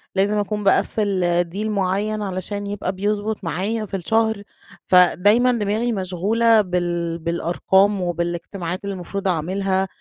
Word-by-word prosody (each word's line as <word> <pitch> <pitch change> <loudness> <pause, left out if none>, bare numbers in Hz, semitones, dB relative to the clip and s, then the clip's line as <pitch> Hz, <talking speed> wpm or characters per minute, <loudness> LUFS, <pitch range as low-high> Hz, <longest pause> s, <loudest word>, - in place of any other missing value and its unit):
لازم 200 +2 +2
أكون 210 +1 -2
باقفل 190 -3 +2
deal 205 +3 -3
معين 205 +2 -1
علشان 200 +1 -4
يبقى 200 -2 -3
بيضبط 205 +2 -2
معايا 205 +6 -2
في 195 - -4
الشهر 220 +2 0 0.4
فدايمًا 205 +7 +5
دماغي 225 +1 0
مشغولة 215 +4 +2
بال 175 -3 -2
بالأرقام 185 +4 +1
وبالاجتماعات 175 +1 -3
اللي 200 0 -3
المفروض 195 +2 -5
أعملها 190 +3 0
195 Hz, 120 wpm, -21 LUFS, 180-210 Hz, 0.4 s, فدايمًا